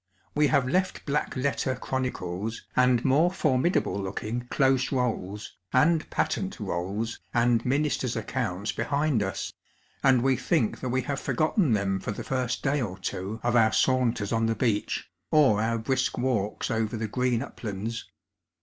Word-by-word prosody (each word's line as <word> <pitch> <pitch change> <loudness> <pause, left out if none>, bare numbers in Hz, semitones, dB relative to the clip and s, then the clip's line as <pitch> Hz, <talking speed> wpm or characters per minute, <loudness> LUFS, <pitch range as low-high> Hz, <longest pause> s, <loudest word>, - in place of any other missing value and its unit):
We 150 0 +3
have 135 -3 +2
left 185 +7 0
black 145 0 -1
letter 130 0 0
chronicles 115 -5 -3
and 125 -1 +3
more 145 +6 +4
formidable 150 - +1
looking 110 +5 -4
Close 135 -1 +2
KoUs, 110 -6 -2 0.2
and 155 +5 +3
Patent - - -1
Rolls, 100 +6 -3 0.2
and 120 -1 +3
Ministers' 135 -2 0
Accounts 110 -3 -2
behind 140 +1 0
us, 95 -1 -3 0.5
and 130 -3 +4
we 135 -1 +3
think 125 -2 0
that 130 - -3
we 130 +1 0
have 140 +2 -2
forgotten 155 - +1
them 100 -2 +1
for 100 - -4
the - - -6
first 130 -2 -2
day 145 0 +1
or 95 -6 -3
two 95 +3 -4
of 120 0 +1
our 110 -2 +5
saunters 125 -5 +2
on 115 0 +2
the 115 - +1
beach 110 -2 -1
» - - -53
or 135 -9 +5
our 115 +1 +1
brisk 130 +4 0
walks 115 -5 -1
over 110 0 -1
the 110 0 -2
green 125 +2 0
uplands. 110 -2 -5
120 Hz, 160 wpm, -27 LUFS, 110-135 Hz, 0.5 s, our